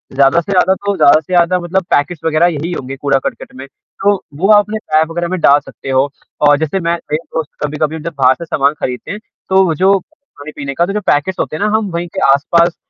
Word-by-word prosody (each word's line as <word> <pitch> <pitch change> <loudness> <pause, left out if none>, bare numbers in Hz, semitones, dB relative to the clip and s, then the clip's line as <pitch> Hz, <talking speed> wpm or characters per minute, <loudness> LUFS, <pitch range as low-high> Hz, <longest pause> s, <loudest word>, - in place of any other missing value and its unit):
ज़्यादा 135 +4 +4
से 200 - -7
ज़्यादा 190 0 +3
तो 200 0 0
ज़्यादा 145 +2 +6
से 160 +4 -8
ज़्यादा 175 +1 +3
मतलब 180 +2 -1
पैकेट्स 145 +3 0
वग़ैरह 160 +1 +3
यही 160 +4 -4
होंगे 135 -4 -5
कूड़ा-करकट 140 -2 -2
में। 130 +1 -8
तो 200 +8 -2 0.2
वो 185 +5 +1
आप 210 - +8
अपने 215 +1 -4
टाय 155 -5 +1
वग़ैरह 175 +1 -3
में 185 -1 -2
डाल 145 -2 +5
सकते 135 - -11
हो 135 +2 +2 0.4
और 145 0 +5
जैसे 160 +4 -1
मैं 170 -1 0 0.2
मेरे 155 +2 -1
दोस्त 160 -2 -2
कभी-कभी 150 +1 -2
हम 160 - -7
जब 170 - -5
बाहर 130 -1 +4
से 170 - -8
सामान 140 -2 +1
खरीदते 125 -1 -4
हैं, 210 - -5 0.3
तो 190 0 +4
वो 165 -3 0
जो 190 +4 +3
खाने-पीने 150 - -10
का, 170 +5 +1
तो 195 - -4
जो 210 - -2
पैकेट्स 165 +6 +1
होते - - -2
हैं 180 - -2
ना 210 - +1
हम 210 -3 -3
वहीं 170 +1 -3
के - - -1
आस-पास 170 +5 +3
165 Hz, 240 wpm, -15 LUFS, 145-185 Hz, 0.4 s, आप